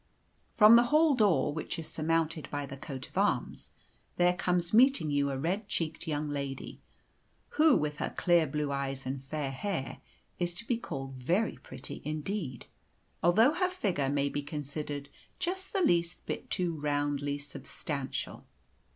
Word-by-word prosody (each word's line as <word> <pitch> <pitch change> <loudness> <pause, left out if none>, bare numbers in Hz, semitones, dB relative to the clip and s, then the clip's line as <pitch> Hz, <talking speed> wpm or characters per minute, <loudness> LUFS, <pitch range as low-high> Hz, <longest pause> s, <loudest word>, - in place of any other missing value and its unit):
From 220 +1 +8
the 240 - +5
hall 305 +3 +4
door, 205 - +3
which 155 - -4
is 165 - -5
surmounted 160 0 -1
by 145 -1 -3
the 135 0 -8
coat 135 -1 -6
of - - -3
arms, - - 0 0.5
there 175 0 +4
comes 180 -1 0
meeting 245 - +5
you 140 0 +2
a 135 - -2
red 185 +9 -1
cheeked 165 -3 -3
young 150 -1 -1
lady, 140 -2 -5 0.7
who, 305 -2 +5
with 150 0 -2
her - - -2
clear 175 -3 +3
blue 150 0 -2
eyes 135 -1 -2
and 130 +1 -3
fair 140 0 -3
hair, 135 0 -3 0.4
is 175 -1 0
to 235 - -3
be 235 0 +1
called 135 - -6
very 170 - 0
pretty 130 0 -8
indeed, 155 - -4 0.6
although 220 - +5
her 365 +2 +1
figure 190 - -1
may 140 0 +1
be 145 - -2
considered 145 0 -5 0.3
just 380 +1 -3
the 390 - 0
least 170 - +1
bit - - -5
too 170 -4 -1
roundly 145 -1 0
substantial. 140 0 -5
155 Hz, 160 wpm, -31 LUFS, 140-190 Hz, 0.7 s, From